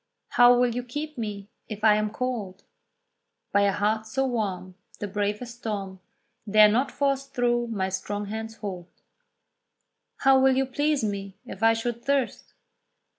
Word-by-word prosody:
How 245 Hz, 0 st, +6 dB
will 245 Hz, -1 st, +2 dB
you 245 Hz, -, -2 dB
keep 295 Hz, +5 st, -6 dB
me, 210 Hz, -4 st, -5 dB, 0.2 s
if 215 Hz, -1 st, -7 dB
I 215 Hz, -1 st, +7 dB
am 215 Hz, 0 st, +1 dB
cold? 215 Hz, -5 st, -4 dB, 0.9 s
"By 200 Hz, -, +3 dB
a -, -, +3 dB
heart 215 Hz, +2 st, 0 dB
so 270 Hz, +5 st, 0 dB
warm, 195 Hz, -7 st, -3 dB, 0.2 s
The 205 Hz, -, -4 dB
bravest 210 Hz, +4 st, -3 dB
storm 195 Hz, -4 st, -4 dB, 0.5 s
Dare 210 Hz, +1 st, +7 dB
not 245 Hz, +6 st, +1 dB
force 275 Hz, -1 st, 0 dB
through 240 Hz, -2 st, 0 dB
my 195 Hz, -5 st, -2 dB
strong 205 Hz, +2 st, -3 dB
hands' 220 Hz, +2 st, -6 dB
hold." 185 Hz, -5 st, -6 dB, 1.3 s
How 270 Hz, 0 st, +6 dB
will 265 Hz, 0 st, +4 dB
you 270 Hz, -, +2 dB
please 290 Hz, +1 st, 0 dB
me, 200 Hz, -2 st, -4 dB
if 195 Hz, -, -9 dB
I 225 Hz, 0 st, +5 dB
should 235 Hz, +1 st, -3 dB
thirst? 275 Hz, -2 st, -1 dB
220 Hz, 155 wpm, -26 LUFS, 205-250 Hz, 1.3 s, I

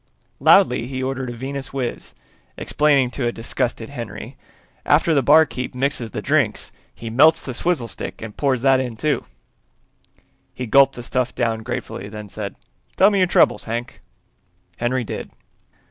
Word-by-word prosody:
Loudly 115 Hz, -, +4 dB
he 130 Hz, 0 st, -4 dB
ordered 130 Hz, -1 st, -3 dB
a -, -, -5 dB
Venuswiz, 135 Hz, 0 st, -5 dB, 0.4 s
explaining 140 Hz, -4 st, +2 dB
to 125 Hz, -3 st, -2 dB
a -, -, 0 dB
disgusted 115 Hz, -1 st, -3 dB
Henry, -, -, -7 dB, 0.5 s
"After 160 Hz, +3 st, +3 dB
the 140 Hz, -, +3 dB
barkeep 145 Hz, -3 st, +3 dB
mixes 125 Hz, -3 st, -1 dB
the -, -, -6 dB
drink -, -, +2 dB, 0.3 s
he 115 Hz, -1 st, -8 dB
melts 155 Hz, +7 st, +5 dB
the 130 Hz, -, -4 dB
swizzle 155 Hz, -2 st, 0 dB
stick -, -, -7 dB
and 110 Hz, -2 st, -8 dB
pours 135 Hz, -4 st, 0 dB
that 135 Hz, -1 st, +5 dB
in, 125 Hz, -4 st, -4 dB
too." 150 Hz, +4 st, 0 dB, 1.3 s
He 125 Hz, -, -4 dB
gulped 135 Hz, +4 st, +5 dB
the 120 Hz, -, -7 dB
stuff 125 Hz, 0 st, -1 dB
down 115 Hz, -3 st, -1 dB
gratefully, 100 Hz, -2 st, -5 dB
then 105 Hz, -1 st, -8 dB
said, 100 Hz, -1 st, -6 dB, 0.4 s
"Tell 200 Hz, +2 st, +5 dB
me 200 Hz, -, +1 dB
your 185 Hz, -, +4 dB
troubles, -, -, +3 dB
Hank." 120 Hz, +2 st, -5 dB, 0.8 s
Henry 125 Hz, +1 st, 0 dB
did. -, -, -6 dB
130 Hz, 155 wpm, -21 LUFS, 120-140 Hz, 1.3 s, melts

